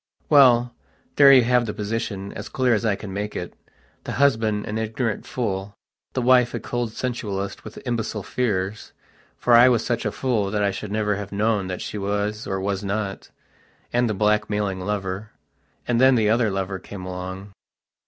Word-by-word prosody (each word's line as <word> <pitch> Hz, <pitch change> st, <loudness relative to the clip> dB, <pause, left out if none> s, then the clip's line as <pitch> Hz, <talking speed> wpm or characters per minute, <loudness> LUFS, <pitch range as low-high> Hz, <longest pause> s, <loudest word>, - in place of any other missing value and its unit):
Well, 125 Hz, -4 st, +6 dB, 0.4 s
there 140 Hz, -1 st, +8 dB
you 130 Hz, -2 st, +7 dB
have 125 Hz, 0 st, +2 dB
the 105 Hz, -, -4 dB
position, 105 Hz, -2 st, -4 dB
as -, -, -7 dB
clear 130 Hz, -2 st, +2 dB
as 110 Hz, -, 0 dB
I 110 Hz, -3 st, +2 dB
can 100 Hz, -1 st, -8 dB
make 105 Hz, +2 st, -4 dB
itthe 90 Hz, -, -5 dB, 0.6 s
husband 110 Hz, -7 st, +2 dB
an 110 Hz, +1 st, -3 dB
ignorant 110 Hz, 0 st, -2 dB
fool, 100 Hz, -4 st, -3 dB, 0.4 s
the 130 Hz, -, -1 dB
wife 125 Hz, -1 st, +4 dB
a -, -, -2 dB
cold 120 Hz, -2 st, -3 dB
sensualist 105 Hz, -6 st, -4 dB
with 110 Hz, -, -10 dB
imbecile 115 Hz, -4 st, -2 dB
fearsfor 105 Hz, -3 st, -2 dB, 0.6 s
I 120 Hz, +2 st, +8 dB
was 120 Hz, -3 st, +1 dB
such 120 Hz, -2 st, -1 dB
a 105 Hz, -, -1 dB
fool 110 Hz, -3 st, 0 dB
that 105 Hz, 0 st, 0 dB
I 100 Hz, -, +2 dB
should 100 Hz, +1 st, -6 dB
never 105 Hz, -1 st, 0 dB
have 100 Hz, -1 st, -6 dB
known 105 Hz, -1 st, 0 dB
what 90 Hz, -1 st, -4 dB
she 105 Hz, -, -5 dB
was 105 Hz, +2 st, -2 dB
or 95 Hz, 0 st, -2 dB
was 100 Hz, 0 st, -2 dB
notand 100 Hz, 0 st, -3 dB, 0.8 s
the 110 Hz, -, -1 dB
blackmailing 105 Hz, -1 st, 0 dB
lover. 100 Hz, +1 st, -4 dB, 0.5 s
And 120 Hz, 0 st, +2 dB
then 130 Hz, 0 st, +6 dB
the 110 Hz, -2 st, +3 dB
other 115 Hz, -1 st, +3 dB
lover 95 Hz, -1 st, -3 dB
came 95 Hz, -1 st, -9 dB
along.... 95 Hz, +2 st, -6 dB
105 Hz, 175 wpm, -23 LUFS, 100-120 Hz, 0.8 s, there